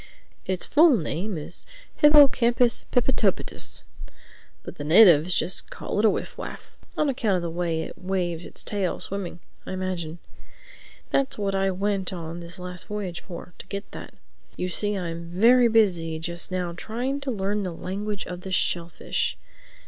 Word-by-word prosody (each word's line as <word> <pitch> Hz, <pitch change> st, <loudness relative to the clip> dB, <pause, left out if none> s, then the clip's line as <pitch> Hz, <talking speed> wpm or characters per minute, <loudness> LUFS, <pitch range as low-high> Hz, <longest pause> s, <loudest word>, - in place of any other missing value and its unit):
Its 185 Hz, -1 st, -1 dB
full 300 Hz, -3 st, +6 dB
name 175 Hz, +3 st, -3 dB
is 155 Hz, +3 st, -3 dB, 0.3 s
hippocampus 255 Hz, -5 st, +5 dB
pippitopitus. 245 Hz, -6 st, +1 dB, 0.8 s
But -, -, -10 dB
the -, -, -3 dB
natives 170 Hz, 0 st, +6 dB
just 180 Hz, -, +1 dB
call -, -, -4 dB
it 215 Hz, -, +3 dB
a -, -, +7 dB
Wiff -, -, -3 dB
Waff—on 305 Hz, -, -5 dB
account 225 Hz, -7 st, +1 dB
of 180 Hz, -, -1 dB
the 170 Hz, -, -3 dB
way 165 Hz, -1 st, -1 dB
it -, -, -9 dB
waves 180 Hz, -3 st, -2 dB
its -, -, -4 dB
tail, 200 Hz, -4 st, -1 dB
swimming, 185 Hz, -3 st, -5 dB, 0.2 s
I -, -, -6 dB
imagine. 180 Hz, -3 st, -3 dB, 0.9 s
That's 275 Hz, 0 st, +1 dB
what 200 Hz, -2 st, -1 dB
I 195 Hz, 0 st, +1 dB
went 195 Hz, 0 st, -1 dB
on 170 Hz, -2 st, -6 dB
this 170 Hz, 0 st, -7 dB
last 180 Hz, -1 st, -8 dB
voyage 200 Hz, -4 st, -4 dB
for, 175 Hz, -1 st, -9 dB
to -, -, -9 dB
get 200 Hz, 0 st, -6 dB
that. -, -, -9 dB, 0.4 s
You 180 Hz, -, -2 dB
see 205 Hz, +3 st, -1 dB
I'm 170 Hz, -2 st, -4 dB
very 235 Hz, +7 st, +5 dB
busy 180 Hz, -8 st, +2 dB
just 170 Hz, +2 st, -5 dB
now 180 Hz, -2 st, -2 dB
trying 250 Hz, +9 st, -3 dB
to 280 Hz, -, -4 dB
learn 205 Hz, -2 st, -1 dB
the 185 Hz, -3 st, -3 dB
language 200 Hz, +4 st, -4 dB
of 180 Hz, 0 st, -7 dB
the 190 Hz, -, -7 dB
shellfish. 170 Hz, -2 st, -1 dB
185 Hz, 160 wpm, -25 LUFS, 175-210 Hz, 0.9 s, a